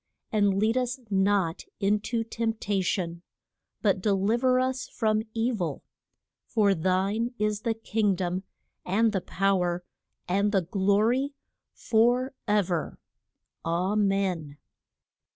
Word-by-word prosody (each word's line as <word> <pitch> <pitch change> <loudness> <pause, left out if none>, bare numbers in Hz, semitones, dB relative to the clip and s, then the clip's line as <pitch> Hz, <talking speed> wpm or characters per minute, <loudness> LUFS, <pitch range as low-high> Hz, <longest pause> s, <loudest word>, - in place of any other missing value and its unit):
And 205 -3 +2
lead 220 +4 +2
us 250 +1 -1
not 195 -3 +1 0.2
in 205 +1 +2
to 225 +2 -2
tempt 225 -1 -3
a 195 -1 +2
tion, 175 -2 -2 0.6
but 200 -3 +2
del 200 0 +1
iv 240 +2 0
er 255 0 +4
us 255 0 -1
from 215 -1 0
e 230 +2 +1
vil: 175 - -3 0.6
For 210 -4 +3
thine 195 +7 0
is 210 0 0
the 225 0 0
King 220 -3 0
dom, 180 0 -2 0.4
and 220 +5 +2
the 195 -3 -1
pow 195 +1 +1
er, 175 0 -1 0.4
and 200 +3 +2
the 195 -3 +2
glo 200 +3 +2
ry, 255 +5 +2 0.5
for 245 +4 +2
ever. 190 -6 0 0.7
_A 175 +5 0
men. 195 -8 0
205 Hz, 135 wpm, -27 LUFS, 190-225 Hz, 0.7 s, er